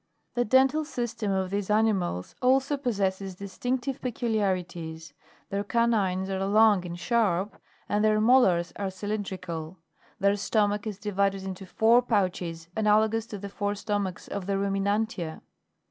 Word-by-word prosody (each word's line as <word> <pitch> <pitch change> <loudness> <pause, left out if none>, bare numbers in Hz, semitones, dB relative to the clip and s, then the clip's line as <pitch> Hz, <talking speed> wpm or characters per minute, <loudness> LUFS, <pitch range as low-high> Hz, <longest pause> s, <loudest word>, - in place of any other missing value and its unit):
4. 245 - +1
The - - -13
dental 265 +5 +4
system 235 -7 -3
of 190 -1 -1
these 200 0 -2
animals 210 - +1
also 265 +3 +3
possesses 195 -7 -2
distinctive 245 +7 -3
peculiarities; 185 - -2 0.4
their 200 +1 -1
canines 205 -5 +1
are 190 0 -2
long 205 -1 +4
and 175 0 -6
sharp, 205 -2 0 0.3
and 205 +1 +1
their 215 0 +4
molars 215 -7 +4
are 200 -1 -2
cylindrical. 190 -4 -5 0.4
Their 200 +1 +3
stomach 205 +1 0
is 210 -3 -4
divided 200 -1 0
into 190 0 -6
four 230 +5 +4
pouches 180 -7 -1
analogous 220 +1 +2
to 210 - -6
the 200 +1 -6
four 205 +1 -2
stomachs 200 -3 -3
of 200 -2 -5
the 200 - 0
Ruminantia. 195 -3 -1
205 Hz, 140 wpm, -27 LUFS, 190-225 Hz, 0.4 s, dental